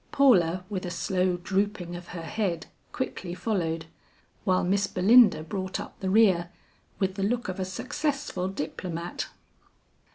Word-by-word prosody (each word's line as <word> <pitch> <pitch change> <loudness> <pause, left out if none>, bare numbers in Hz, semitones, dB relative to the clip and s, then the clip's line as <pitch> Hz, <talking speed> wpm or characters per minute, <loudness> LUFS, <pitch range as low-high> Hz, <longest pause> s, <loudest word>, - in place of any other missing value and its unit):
Paula 185 -10 +4
with 190 -2 -4
a 180 - -3
slow 180 +1 0
drooping 190 -1 -1
of 175 0 -8
her 170 -2 -7
head 175 -2 -2 0.3
quickly 185 -8 -4
followed, 170 -5 -1 0.6
while 185 -1 +3
Miss 195 +2 +2
Belinda 205 -2 +6
brought 185 +3 -3
up - - -8
the 190 - -2
rear, 190 -5 +4 0.5
with 190 -1 0
the 195 - -5
look 235 +3 0
of 185 0 -4
a 185 - 0
successful 275 -1 -2
diplomat. 175 -1 -4
185 Hz, 140 wpm, -27 LUFS, 175-205 Hz, 0.6 s, Belinda